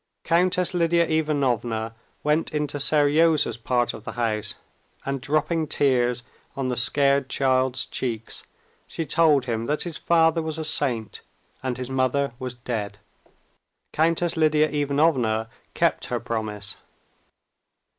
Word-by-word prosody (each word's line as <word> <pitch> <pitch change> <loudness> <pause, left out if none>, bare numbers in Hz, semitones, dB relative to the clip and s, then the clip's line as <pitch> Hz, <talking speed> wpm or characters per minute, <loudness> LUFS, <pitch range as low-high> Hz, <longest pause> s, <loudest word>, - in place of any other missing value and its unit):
Countess 180 +2 +2
Lidia 170 -1 +3
Ivanovna 125 -8 0 0.3
went 150 +2 +1
into 150 -1 -2
Seryozha's 150 -3 +3
part 120 +1 0
of 105 - -10
the - - -6
house, 110 -3 -1 0.5
and 140 -1 -2
dropping 155 +3 0
tears 125 -4 +1 0.3
on 135 -2 -2
the 125 - -1
scared 140 +2 +2
child's 130 -1 +1
cheeks, 115 -3 -4 0.4
she 165 - -4
told 150 -5 +3
him 115 -2 -2
that 150 +1 0
his 170 -3 -6
father 165 -1 +3
was 160 0 -4
a 160 - -3
saint 125 -8 0 0.4
and 130 -2 -3
his 130 0 -5
mother 130 0 0
was 125 -1 -5
dead. 110 -5 -4 1.0
Countess 165 +2 +1
Lidia 155 -1 +3
Ivanovna 140 -6 +1 0.3
kept - - +1
her 120 - -2
promise. 110 -3 -4
140 Hz, 125 wpm, -24 LUFS, 120-155 Hz, 1.0 s, Lidia